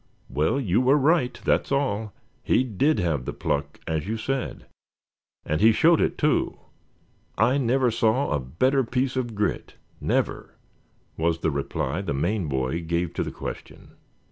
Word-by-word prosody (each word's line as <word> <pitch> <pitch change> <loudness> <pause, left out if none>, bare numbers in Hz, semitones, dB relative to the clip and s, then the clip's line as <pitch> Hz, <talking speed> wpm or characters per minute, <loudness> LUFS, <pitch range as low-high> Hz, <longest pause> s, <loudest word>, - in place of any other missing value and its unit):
"Well, 75 - +1
you 110 -3 +2
were 130 +3 +4
right, 145 -2 +2
that's - - +1
all; 110 -7 0 0.3
he - - +2
did 130 +6 +1
have 80 -8 -1
the - - -4
pluck 70 0 -2
as 80 +1 -2
you 110 +2 -2
said, 135 +3 -3 0.8
and 75 +1 -1
he 110 +1 +7
showed 165 +8 +4
it - - 0
too. 150 0 +1 0.8
I 130 +4 +3
never 125 0 +2
saw 115 +4 +1
a 75 - +1
better 130 - +1
piece 125 +2 -1
of 120 -4 -2
grit, 105 0 -2 0.2
never," - - -1 0.6
was 85 +1 0
the 80 - +1
reply 70 +3 -2
the 85 -8 -3
Maine 90 +5 0
boy 65 +3 -1
gave 85 +1 -2
to - - -2
the - - -2
question. - - -8
110 Hz, 160 wpm, -25 LUFS, 80-130 Hz, 0.8 s, he